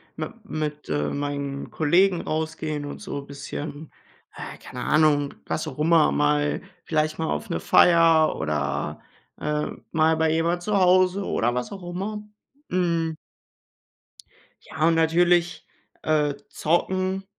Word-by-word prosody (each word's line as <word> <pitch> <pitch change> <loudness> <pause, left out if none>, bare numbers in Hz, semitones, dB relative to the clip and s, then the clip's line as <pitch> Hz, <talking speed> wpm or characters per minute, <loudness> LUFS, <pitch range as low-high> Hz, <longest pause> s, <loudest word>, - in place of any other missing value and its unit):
mit 230 -1 -7
mit, 150 -1 -4
äh, 75 0 0
meinen 140 - -4
Kollegen 175 +3 +3
rausgehen 155 -1 -3
und 145 - -7
so 140 - -5
bisschen 145 +2 -7 0.4
ah, - - -8
keine 125 0 -8
Ahnung, 150 -2 +3
was 155 - -3
auch 135 - -7
immer 160 0 +4
mal 145 0 +1 0.2
vielleicht 155 -1 0
mal 160 - -1
auf 225 - -3
'ne 170 - -1
Feier 165 -2 +5
oder, 75 -1 -2 0.4
äh, 150 0 -1 0.2
mal 160 0 +3
bei 160 0 +2
jemand 165 +2 +1
zu 210 +1 +1
Hause 185 +1 +4
oder 120 +1 0
was 125 0 -3
auch 195 -2 -8
immer. 195 +4 -4 0.5
Mhm. 170 -3 0 1.5
Ja, 155 - -1
und 165 - +4
natürlich, 170 +1 +2 0.4
äh, 150 -2 +1
Zocken 185 +4 0
160 Hz, 130 wpm, -24 LUFS, 145-175 Hz, 1.5 s, Feier